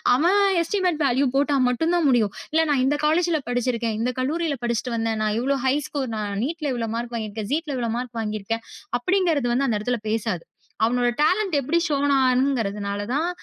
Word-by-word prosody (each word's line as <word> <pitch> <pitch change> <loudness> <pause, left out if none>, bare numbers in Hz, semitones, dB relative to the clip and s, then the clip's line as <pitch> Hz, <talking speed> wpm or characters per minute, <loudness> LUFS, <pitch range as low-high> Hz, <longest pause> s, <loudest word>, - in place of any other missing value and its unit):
அவன் 355 +9 +3 0.2
எஸ்டிமெட் 355 -3 0
வேலீவ் 265 0 +2
போட்டா 285 +1 +2
மட்டும்தான் 325 +5 +1
முடியும். 220 -5 +2 0.2
இல்ல 320 +1 +3
நான் 265 -3 +2
இந்தக் 290 +2 0
காலேஜ்ல 325 0 +2
படிச்சு 245 +1 +1
இருக்கேன். 230 -2 -2
இந்தக் 250 +2 -1
கல்லூரியில 305 +1 -1
படிச்சுட்டு 235 0 -1
வந்தேன், 225 -1 -1
நான் 215 0 0
இவ்ளோ 275 +2 +1
ஹை 265 - +3
ஸ்கோர் 270 -4 -3
நான் 205 -1 -3
நீட்ல 310 -1 -3
இவ்ளோ 230 -2 -2
மார்க் 235 0 -4
வாங்கி 215 -1 -4
இருக்கேன். 215 -1 -5
ஜீட்ல 305 -3 -1
இவ்ளோ 230 -2 -1
மார்க் 245 -2 -5
வாங்கி 215 0 -3
இருக்கேன், 225 +3 -3 0.4
அப்படிங்கறத 325 -6 +1
அந்த 230 -6 +1
இடத்துல 240 +2 -1
பேசாது. 215 -6 -1 0.4
அவனோட 245 +1 +2
டாலெண்ட் 365 +2 +2
எப்படி 295 +6 0
ஸ்ஷோன் 285 -2 +1
ஆகுறனால 220 -6 0
தான் 325 +4 +1
255 Hz, 185 wpm, -23 LUFS, 225-305 Hz, 0.4 s, அவன்